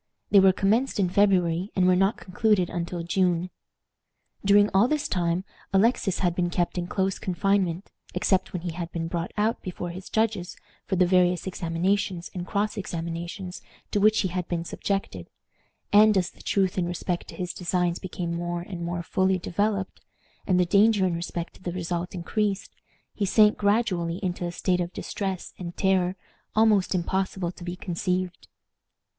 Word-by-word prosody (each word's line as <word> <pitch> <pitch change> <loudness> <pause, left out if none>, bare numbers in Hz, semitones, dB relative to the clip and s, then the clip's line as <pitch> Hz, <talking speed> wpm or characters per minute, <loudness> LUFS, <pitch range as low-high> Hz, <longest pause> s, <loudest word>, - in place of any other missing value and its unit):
They 200 - +8
were 190 0 +7
commenced 215 +6 +1
in 185 -3 +2
February, 185 -2 +2
and 185 - +3
were 185 0 +5
not 195 +4 +2
concluded 190 -1 +1
until 170 0 -3
June. 180 0 +1 0.9
During 205 +1 +6
all 195 +5 +5
this 300 +1 0
time 175 0 0 0.3
Alexis 195 -1 +3
had 175 - +2
been 175 0 0
kept 175 +1 -1
in 175 - -3
close 190 +1 -1
confinement, 185 -1 0 0.2
except 190 -2 +1
when 175 -2 -5
he 175 - -2
had 170 0 -5
been 165 -1 -3
brought 170 0 -3
out 215 +2 +1
before 175 -1 -5
his 185 +2 -9
judges 220 -5 -1 0.3
for 190 - 0
the 180 0 +4
various 180 -1 +3
examinations 180 +1 -1
and 180 -1 -5
cross 210 +1 -1
examinations 175 +1 -5 0.3
to 205 - +1
which 215 +1 +4
he 190 - -1
had 180 0 -3
been 170 -1 -2
subjected; 185 - -3 0.6
and 210 0 +7
as 185 0 0
the - - -17
truth 190 -2 +1
in 175 - 0
respect 175 0 -3
to - - -10
his 180 -1 -4
designs 180 -1 0
became 175 -2 -4
more 175 0 -3
and 175 -1 -6
more 170 0 -3
fully 190 +2 +1
developed, 200 +2 -2 0.5
and 185 -2 +3
the 180 - +4
danger 205 +2 +4
in 180 - +1
respect 170 0 -4
to - - -19
the 175 -2 -4
result 175 0 -3
increased, 200 +3 -2 0.4
he 210 - -3
sank 210 +2 +5
gradually 200 -5 +1
into 175 -1 -2
a - - -4
state 180 0 0
of 175 0 -3
distress 190 -3 -4
and 175 -2 -7
terror 190 -1 +2 0.4
almost 215 -4 +4
impossible 185 0 -1
to 180 - -12
be 175 0 -4
conceived. 180 0 -3
185 Hz, 175 wpm, -26 LUFS, 175-195 Hz, 0.9 s, They